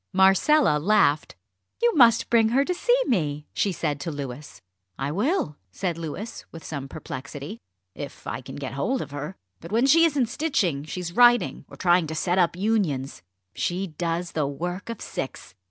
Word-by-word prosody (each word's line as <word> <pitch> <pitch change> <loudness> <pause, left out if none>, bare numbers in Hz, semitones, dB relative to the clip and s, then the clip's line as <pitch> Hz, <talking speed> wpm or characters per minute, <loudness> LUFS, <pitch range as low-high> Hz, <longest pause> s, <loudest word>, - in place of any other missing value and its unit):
Marcella 190 - +4
laughed. 155 -4 +2 0.4
"You 475 0 +3
must 235 -5 +5
bring 225 -2 +5
her 270 +4 +3
to 360 - 0
see 485 +7 +2
me," 150 - 0
she 200 - +1
said 150 -4 -2
to 145 - -4
Louis. 140 -3 -7 0.4
"I 135 +1 -2
will," 205 - 0
said 180 - -2
Louis, 170 +7 -6
with 165 - -10
some 140 -3 -5
perplexity; 140 -3 -7 0.3
"if - - -8
I - - -4
can - - -9
get 135 -2 -5
hold 245 - -1
of - - -12
her. 145 +5 -5 0.2
But 165 - -10
when 230 +4 +3
she 325 +5 +6
isn't 285 -6 +2
stitching 225 - -1
she's 175 +2 -5
writing, 240 -1 +4
or - - -12
trying 175 -2 +3
to 160 - -5
set 175 +4 +1
up 170 -1 +3
Unions. 180 - -1 0.3
She 180 +2 -1
does 170 0 -3
the 150 -3 0
work 175 +9 -5
of 230 - -6
six. 130 - -6
175 Hz, 175 wpm, -25 LUFS, 150-230 Hz, 0.4 s, she